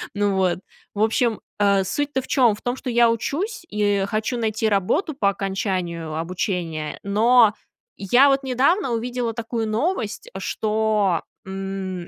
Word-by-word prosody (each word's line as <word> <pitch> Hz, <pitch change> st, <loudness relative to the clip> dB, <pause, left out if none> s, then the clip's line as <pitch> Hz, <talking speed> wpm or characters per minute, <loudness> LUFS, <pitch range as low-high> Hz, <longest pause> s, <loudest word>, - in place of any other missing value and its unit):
Ну 205 Hz, -1 st, +1 dB
вот, 185 Hz, -2 st, +1 dB, 0.4 s
в 210 Hz, -, +2 dB
общем, 225 Hz, 0 st, +1 dB, 0.2 s
а, 200 Hz, -1 st, +3 dB
суть-то 285 Hz, +7 st, -1 dB
в -, -, -12 dB
чём? 245 Hz, -6 st, +3 dB
В -, -, -15 dB
том, 245 Hz, 0 st, -1 dB
что 260 Hz, -, -5 dB
я 235 Hz, -1 st, +4 dB
учусь 340 Hz, -, -3 dB
и 205 Hz, -2 st, +1 dB
хочу 215 Hz, +4 st, -2 dB
найти 220 Hz, 0 st, 0 dB
работу 205 Hz, -, +1 dB
по 200 Hz, -6 st, +2 dB
окончанию 185 Hz, -5 st, -3 dB
обучения. 165 Hz, -2 st, -3 dB
Но 220 Hz, +2 st, +5 dB, 0.4 s
я 245 Hz, +8 st, +5 dB
вот 275 Hz, 0 st, +2 dB
недавно 270 Hz, +6 st, +2 dB
увидела 240 Hz, 0 st, -2 dB
такую 225 Hz, 0 st, -3 dB
новость, 225 Hz, -, -2 dB
что, 210 Hz, -3 st, 0 dB, 0.2 s
м, 190 Hz, -2 st, -5 dB
215 Hz, 145 wpm, -22 LUFS, 195-245 Hz, 0.4 s, Но